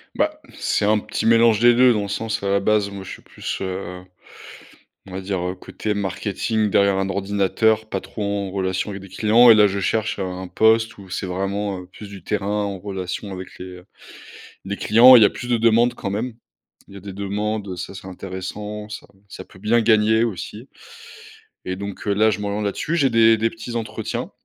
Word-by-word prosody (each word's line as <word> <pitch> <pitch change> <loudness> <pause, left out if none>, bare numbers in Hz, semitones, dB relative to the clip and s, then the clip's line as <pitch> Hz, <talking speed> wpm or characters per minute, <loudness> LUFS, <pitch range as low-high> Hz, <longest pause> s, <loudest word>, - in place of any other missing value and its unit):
Bah, - - 0 0.2
c'est 105 - 0
un 105 0 +3
petit 110 - -4
mélange 115 -1 +5
des 120 0 +6
2 125 -1 +6
dans 105 - -1
le - - -4
sens, 110 +2 -3
à 100 - -1
la 100 0 +3
base, 105 0 +1
moi, 100 -1 -8
je - - -9
suis - - -10
plus, - - -6
heu, 90 -1 -5 1.1
on - - -11
va 95 +1 -5
dire, 95 -1 -3
heu, 90 +1 -3
côté 105 +3 -4
marketing 105 +2 -1
derrière 100 -1 +3
un 95 0 -1
ordinateur, 100 +3 +1
pas 95 - -3
trop 105 - -7
en 100 -1 -2
relation 95 +1 -2
avec 95 -1 -7
des - - -11
clients 115 +5 +5
et - - +8
là, 105 -1 +6
je 100 +1 -3
cherche 110 +3 -1
un 95 -1 -4
poste 110 +4 +2
où 95 -2 -13
c'est 95 - -4
vraiment, 95 +1 -2
heu, - - -12
plus 100 +2 -12
du 95 -3 -11
terrain 100 -1 -2 0.2
en 100 -2 -4
relation 95 0 -5
avec 95 0 -9
les, 90 - -7
heu, 90 +1 -14 0.8
les 100 +1 -3
clients. 120 +4 +7
Il 115 - +8
y - - +8
a - - +4
plus 125 -2 -7
de 120 - +3
demandes 115 +2 +3
quand 100 - -4
même. 115 +4 -3 0.5
Il 100 - -14
y - - -8
a - - -11
des 100 -1 -8
demandes, 100 +1 -3
heu, 90 - -4
ça - - -6
c'est 95 - -10
intéressant, 100 +3 -7
ça 105 - -8 0.2
ça 95 - -9
peut 95 - -18
bien 115 +3 +2
gagner 110 0 +3
aussi 110 +3 -5 1.0
et 95 - -3
donc, 100 +1 -7
heu, 100 - +2
là, 110 +2 +3
je 100 - -3
m'oriente 105 +1 -3
là 100 - 0
dessus. 165 - -2
J'ai 135 -4 +3
des 115 -1 +5
des 115 +1 +1
petits 115 +1 -8
entretiens 115 -1 -4
100 Hz, 220 wpm, -21 LUFS, 95-110 Hz, 1.1 s, et